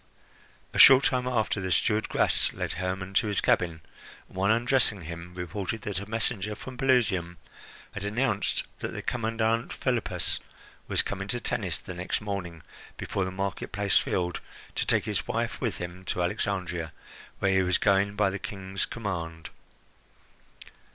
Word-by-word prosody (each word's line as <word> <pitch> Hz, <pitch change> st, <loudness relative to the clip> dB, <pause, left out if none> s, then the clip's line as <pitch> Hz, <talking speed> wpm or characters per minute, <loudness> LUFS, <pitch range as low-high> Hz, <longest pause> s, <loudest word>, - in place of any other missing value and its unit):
A -, -, -1 dB
short 135 Hz, 0 st, +10 dB
time 125 Hz, -1 st, +1 dB
after, 110 Hz, -4 st, +1 dB
the 95 Hz, 0 st, -2 dB
steward 105 Hz, +5 st, +2 dB
Gras -, -, +3 dB
led -, -, -3 dB
Hermon 95 Hz, +2 st, -3 dB
to 105 Hz, -, +3 dB
his 105 Hz, -2 st, +1 dB
cabin, 85 Hz, -3 st, +1 dB, 0.5 s
and -, -, -18 dB
while 95 Hz, +2 st, +2 dB
undressing 120 Hz, -3 st, +2 dB
him 85 Hz, +2 st, -8 dB
reported 100 Hz, +4 st, -4 dB
that 100 Hz, -2 st, -2 dB
a 100 Hz, +1 st, -8 dB
messenger 110 Hz, -2 st, -1 dB
from 130 Hz, +3 st, -8 dB
Pelusium 110 Hz, -10 st, +2 dB, 0.5 s
had 100 Hz, -, -6 dB
announced 110 Hz, 0 st, 0 dB, 0.2 s
that -, -, -4 dB
the -, -, -5 dB
commandant 115 Hz, 0 st, 0 dB
Philippus 125 Hz, -4 st, 0 dB, 0.5 s
was -, -, +2 dB
coming 100 Hz, 0 st, -4 dB
to 120 Hz, +4 st, -2 dB
Tennis -, -, -1 dB
the 90 Hz, -, -8 dB
next 90 Hz, +1 st, -2 dB
morning, 95 Hz, -6 st, -5 dB, 0.3 s
before 100 Hz, -, -2 dB
the -, -, -2 dB
market 95 Hz, +1 st, -3 dB
place 100 Hz, 0 st, +3 dB
filled, 90 Hz, -1 st, -1 dB, 0.3 s
to -, -, -2 dB
take -, -, +3 dB
his -, -, -2 dB
wife -, -, -2 dB
with -, -, -1 dB
him 85 Hz, +1 st, -6 dB
to 90 Hz, -, 0 dB
Alexandria, 90 Hz, -4 st, -2 dB, 0.4 s
where 95 Hz, -, +2 dB
he 95 Hz, 0 st, +4 dB
was 90 Hz, -1 st, +2 dB
going 100 Hz, 0 st, +3 dB
by 105 Hz, -2 st, +3 dB
the 100 Hz, -, -4 dB
King's 95 Hz, -1 st, -4 dB
command. 85 Hz, -7 st, -4 dB
100 Hz, 160 wpm, -28 LUFS, 90-110 Hz, 0.5 s, short